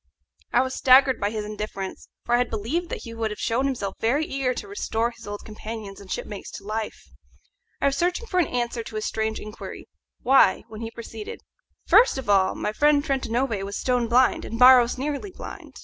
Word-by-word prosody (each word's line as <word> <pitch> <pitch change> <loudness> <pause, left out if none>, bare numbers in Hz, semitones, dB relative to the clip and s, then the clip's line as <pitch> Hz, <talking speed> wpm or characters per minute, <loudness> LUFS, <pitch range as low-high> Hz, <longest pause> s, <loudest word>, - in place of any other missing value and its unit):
I 245 - +4
was 260 0 -4
staggered 260 0 +5
by 205 - 0
his 215 -1 -4
indifference, 210 -2 -6 0.2
for 240 - 0
I 240 - +5
had 245 - +1
believed 305 - -2
he 230 - -6
would 225 -1 -2
have 210 - -6
shown 245 +4 +1
himself 210 -8 -3
very 275 +8 +1
eager 270 -3 -1
to - - -6
restore 235 - -1
his 230 - -14
old 205 0 -6
companions 215 -2 -8
and 195 - -12
shipmates 205 - -5
to - - -8
life. 215 - -5 0.7
I - - 0
was 280 0 +2
searching 355 +8 0
for 365 -5 0
an 350 - +3
answer 240 -1 -2
to 225 - -9
his 215 - -2
strange 220 0 -2
inquiry, 215 +1 -9 0.4
"Why?" 265 -7 +5
when 215 0 -9
he 225 - -4
proceeded, 225 -2 -8 0.4
"First - - +5
of 260 -6 -1
all, 190 -1 +3
my 210 - -2
friend 290 +3 +3
Trentanove 245 -5 -1
was 200 +1 -4
stone 250 -2 +1
blind, 250 +2 +3
and 230 - -5
Barros 250 -1 +7
nearly 290 +8 -3
blind. 370 - -10
235 Hz, 200 wpm, -25 LUFS, 215-265 Hz, 0.7 s, Barros